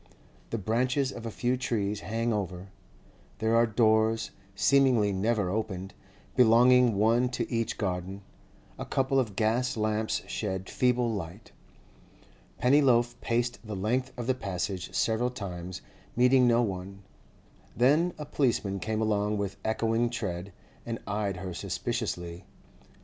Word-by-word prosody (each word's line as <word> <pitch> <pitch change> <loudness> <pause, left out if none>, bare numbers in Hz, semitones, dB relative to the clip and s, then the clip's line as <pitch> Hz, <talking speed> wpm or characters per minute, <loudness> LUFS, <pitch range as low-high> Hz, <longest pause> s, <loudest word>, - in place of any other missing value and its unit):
The 115 - -2
branches 130 +6 0
of 115 -2 -7
a - - -2
few 120 +3 0
trees 105 -5 -1
hang 115 +2 -1
over; 95 -2 -4 0.7
there 110 +2 +1
are 115 0 +5
doors, 110 0 +2 0.2
seemingly 125 -6 +3
never 100 -1 0
opened, 95 -3 -3 0.4
belonging 125 0 +5
one 115 +5 +3
to 125 - -3
each 115 -1 -1
garden; 95 0 -3 0.6
a - - -3
couple 135 0 +1
of 110 -7 -2
gas 115 +4 +1
lamps 110 0 0
shed 95 -3 -4
feeble 125 -2 +2
light. 95 +2 -7 1.1
Pennyloaf 125 -3 +4
paced 120 +1 -1
the 110 -2 -6
length 125 +7 -1
of 120 - -4
the 130 - +2
Passage 95 -5 -4
several 115 +2 +1
times, 90 -6 -7 0.3
meeting 125 +1 +5
no 120 0 +4
one. 95 -1 -5 0.7
Then 150 +9 +3
a 150 - -6
policeman 115 -9 0
came 110 +2 -1
along 105 -1 0
with 100 -1 -3
echoing 115 +1 +1
tread, 100 -5 -4 0.3
and 115 -1 -4
eyed 100 -2 -2
her 90 0 -5
suspiciously. 85 +1 -4
110 Hz, 135 wpm, -28 LUFS, 100-120 Hz, 1.1 s, are